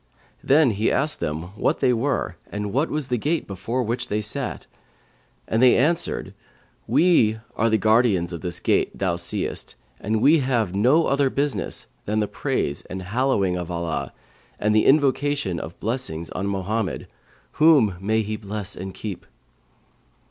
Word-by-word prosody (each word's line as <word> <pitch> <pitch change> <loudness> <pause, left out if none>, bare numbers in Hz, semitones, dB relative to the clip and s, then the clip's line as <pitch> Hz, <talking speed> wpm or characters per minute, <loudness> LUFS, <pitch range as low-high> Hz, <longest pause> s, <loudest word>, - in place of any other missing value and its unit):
Then 140 -2 +4
he 105 +2 0
asked 150 +3 0
them 80 +6 -4
what 105 - 0
they 125 - +3
were 120 -6 -1 0.2
and 105 -1 -4
what 140 +6 +1
was 150 -3 -3
the 125 -2 0
gate 160 +7 -1
before 115 +6 -3
which 120 +2 -2
they 105 - -1
sat, 120 +5 -3 0.8
and 110 - +1
they 130 -1 +6
answered, 165 +6 0 0.5
'We 140 -11 +4 0.2
are 115 - +2
the 110 - +3
guardians 110 -5 +2
of 85 - -6
this 90 -2 -4
gate - - +1
thou 95 -3 0
seest 85 - -3 0.2
and 110 +2 -1
we 150 +7 +5
have 120 -8 0
no 130 +12 +4
other 140 0 +2
business 140 +1 -2 0.2
than 105 +1 0
the 105 - 0
praise 70 -6 -2
and 95 0 -6
hallowing 100 -3 +1
of 90 -1 -4
Allah 85 -2 -3 0.5
and 105 +1 +1
the 110 - +4
invocation 140 - +2
of 80 - -8
blessings 110 -9 -3
on 100 - -3
Mohammed 100 0 -2 0.6
(whom 145 - +6
may 110 +3 +1
He 105 +1 -4
bless 105 -1 -5
and 95 +1 -7
keep!).' 100 -5 -6
110 Hz, 160 wpm, -23 LUFS, 95-130 Hz, 0.8 s, they